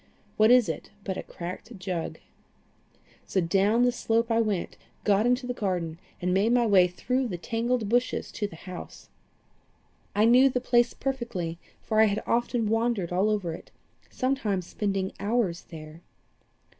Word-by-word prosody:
What 215 +1 +5
is 250 -2 +6
it - - -5
but 190 -2 -3
a - - -4
cracked 185 +6 -8
jug? 180 -3 -4 1.1
So 190 - 0
down 195 +7 +3
the 245 - +4
slope 230 -1 0
I 225 0 +3
went, 205 -5 -2 0.3
got 210 +2 +3
into 250 +1 +1
the 245 - -2
garden, 175 -7 -2 0.2
and 180 0 0
made 205 +5 +3
my 245 -1 +4
way 190 -4 +5
through 250 +8 -1
the 185 -6 -4
tangled 230 +4 -1
bushes 245 +3 0
to 205 - -2
the 165 - -12
house. 180 +1 -10 1.1
I 210 +2 +4
knew 250 +4 +6
the 250 - -1
place 240 -1 +2
perfectly, 225 -11 -3 0.2
for 220 -1 +2
I - - +7
had 205 0 -1
often 235 -1 0
wandered 225 -5 0
all 190 +4 +2
over 200 -6 -1
it, - - -10 0.4
sometimes 225 -9 -1
spending 195 -1 -2
hours 205 -5 0
there. 155 0 -10
215 Hz, 160 wpm, -27 LUFS, 185-240 Hz, 1.1 s, I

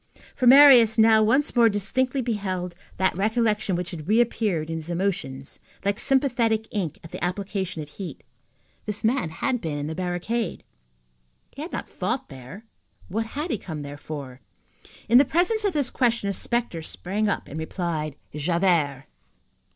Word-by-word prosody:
For 250 - +1
Marius 250 -4 +8
now 220 0 +6
once 260 +8 +2
more 235 -2 +6
distinctly 250 +6 0
beheld 190 -6 -3 0.2
that 190 0 +1
recollection 215 -1 +1
which 175 0 -3
had 160 -3 -8
reappeared 215 -7 +1
in 165 0 -3
his 160 +1 -7
emotions 170 -7 -3 0.3
like 200 +2 0
sympathetic 240 -5 +1
ink 185 -8 -3
at 165 - -11
the - - -6
application 185 -2 -3
of 150 - -13
heat. 185 +4 -8 0.6
This 210 0 -3
man 230 -5 +1
had 250 - -2
been 155 -3 -3
in 145 - -3
the 155 - -4
barricade. 180 +5 -3 0.9
He 280 - -9
had 325 - -6
not - - -4
fought 260 +2 -3
there. 135 - -11 0.4
What 225 +4 -2
had 305 +3 -2
he 220 - -1
come 155 -4 -6
there 145 0 -7
for? 140 -4 -8 0.7
In 240 +3 +7
the - - +7
presence 355 - +1
of 400 - +1
this 290 -4 0
question 235 -5 +1
a 200 - 0
spectre 235 -5 -1
sprang 200 +6 -2
up 205 - -2
and 155 - -6
replied: 160 -3 -3 0.2
"Javert." 155 -4 +1
200 Hz, 165 wpm, -25 LUFS, 165-235 Hz, 0.9 s, Marius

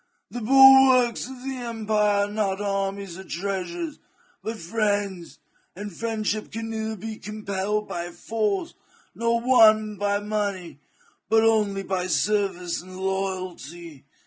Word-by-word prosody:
The 245 - -5
bulwarks 265 -1 +6
of 260 -1 -10
empire 215 -5 0
are - - -6
not 205 -2 -1
armies 195 -2 -3
or - - -8
treasures, 200 - -4 0.4
but 225 +1 -4
friends, 205 -2 -2 0.4
and 205 -1 -7
friendship 215 -1 -2
can 225 +1 -5
neither 220 0 -3
be 215 +2 -7
compelled 210 0 -3
by 175 0 -4
force 215 - -2 0.4
nor 230 0 +1
won 215 -4 +5
by 205 +1 +1
money, 205 -6 -3 0.5
but 220 +1 +4
only 210 -3 +2
by 185 -2 -2
service 185 -2 0
and 185 +1 -11
loyalty. 185 -6 -4
210 Hz, 120 wpm, -25 LUFS, 190-225 Hz, 0.5 s, bulwarks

